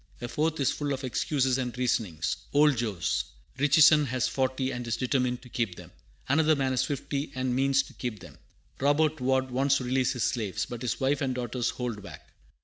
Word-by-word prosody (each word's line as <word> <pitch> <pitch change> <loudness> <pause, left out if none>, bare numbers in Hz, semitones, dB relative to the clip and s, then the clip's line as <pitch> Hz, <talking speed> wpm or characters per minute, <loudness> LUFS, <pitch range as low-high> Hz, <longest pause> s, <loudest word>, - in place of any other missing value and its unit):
A 120 - -4
fourth 155 +5 -1
is 140 - +2
full 145 -1 -2
of 135 +1 -5
"excuses 130 0 0
and 125 -1 -3
reasonings." 90 -10 -1 0.2
"Old 145 0 +5
Jos. 105 -9 -1 0.3
Richison 150 +1 +6
has 130 +1 0
forty, 130 0 -1
and 125 -2 -5
is 115 - -1
determined 125 -1 0
to - - -12
keep 115 -7 -2
them." - - -12 0.4
Another 155 +3 +3
man 135 -2 0
has 130 0 +1
fifty, 140 +1 -3
and 130 -1 -1
"means 135 +1 +3
to - - -14
keep 120 -5 -5
them." - - -13 0.4
Robert 145 +1 +2
Ward 130 0 +1
"wants 135 +2 +2
to 130 - -4
release 130 0 +1
his 125 -3 -2
slaves, 110 -6 -1
but 120 -1 -7
his 115 -8 -2
wife 135 +2 +1
and 130 -2 -1
daughters 125 0 -2
hold 120 -4 -4
back." 85 -8 -11
130 Hz, 200 wpm, -28 LUFS, 120-140 Hz, 0.4 s, Richison